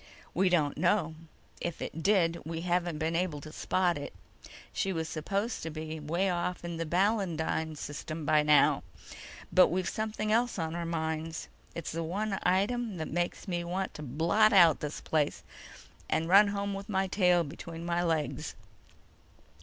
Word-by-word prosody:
"We 185 +2 +3
don't 150 -5 +1
know. 175 -2 +2 0.5
If 170 -2 -3
it 165 - -5
did, 170 -3 +3
we 165 0 -4
haven't 175 -2 0
been 160 +1 -1
able 170 -4 0
to 155 - -9
spot 175 0 0
it. 145 - -7 0.6
She 195 - 0
was 160 -3 -2
supposed 200 +9 -2
to 160 - -4
be 155 0 -5
way 170 +6 0
off 180 -1 -2
in 170 -1 -4
the 165 -1 -3
Balandine 170 -4 0
System 155 +2 -5
by 150 +1 +4
now. 150 -1 +5 0.7
But 185 - +7
we've 180 0 -1
something 215 -1 -2
else 235 +1 +2
on 160 -2 -2
our 170 -1 -3
minds. 160 0 -3 0.3
It's 170 - -4
the 165 - -3
one 195 +5 -2
item 205 +3 +1
that 160 - -4
makes 175 +4 -2
me 175 -2 -1
want 185 +2 -3
to - - -8
blot 165 - +3
out 170 -6 +7
this 150 0 -5
place, 150 -2 0 0.7
and 165 - +1
run 200 +4 +7
home 200 0 -2
with 195 +2 -6
my 190 -1 +1
tail 180 -2 +3
between 165 +2 -8
my 175 0 0
legs. 165 -3 -1
170 Hz, 170 wpm, -30 LUFS, 160-190 Hz, 0.7 s, But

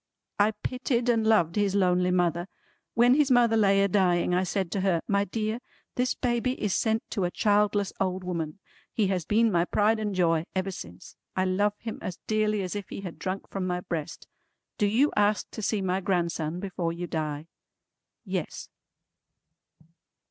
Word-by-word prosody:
"I 210 +2 +4
pitied 250 -1 -1
and 225 -2 +2
loved 175 -7 +3
his 205 -2 +1
lonely 180 -2 +3
mother. 175 -1 +1 0.5
When 240 +2 +6
his 290 0 +3
mother 240 -3 +4
lay 200 -2 +4
a - - +3
dying 180 -3 +2
I 180 +1 +2
said 190 -2 -2
to 195 - -1
her, 185 -4 +2
'My 200 0 +2
dear, 215 +3 -2 0.3
this 250 +1 0
baby 245 0 0
is 210 -3 0
sent 220 0 +1
to 200 - -1
a 175 - +1
childless 205 0 +1
old 185 -1 -1
woman.' 170 -2 -3 0.3
He 205 -4 +1
has 180 -4 -1
been 225 +3 +3
my 170 -2 +3
pride 215 +4 +2
and 210 -2 -2
joy 165 -3 +2
ever 190 +1 -1
since. 90 - -10 0.2
I 185 - +1
love 200 +3 +1
him 225 -1 -6
as 180 - -5
dearly 215 -2 +1
as 185 +2 -4
if 205 -2 -5
he - - -6
had 180 -4 -8
drunk 190 +1 -4
from 190 -2 -2
my 180 0 -1
breast. 160 -4 -5 0.5
Do 205 - +3
you 250 +8 +3
ask 205 0 +2
to - - -6
see 205 -1 0
my 185 +1 0
grandson 170 -3 -1
before 180 -3 -2
you 170 +1 -5
die?" 155 -2 -3 0.8
Yes. - - -4
195 Hz, 180 wpm, -27 LUFS, 180-215 Hz, 0.8 s, When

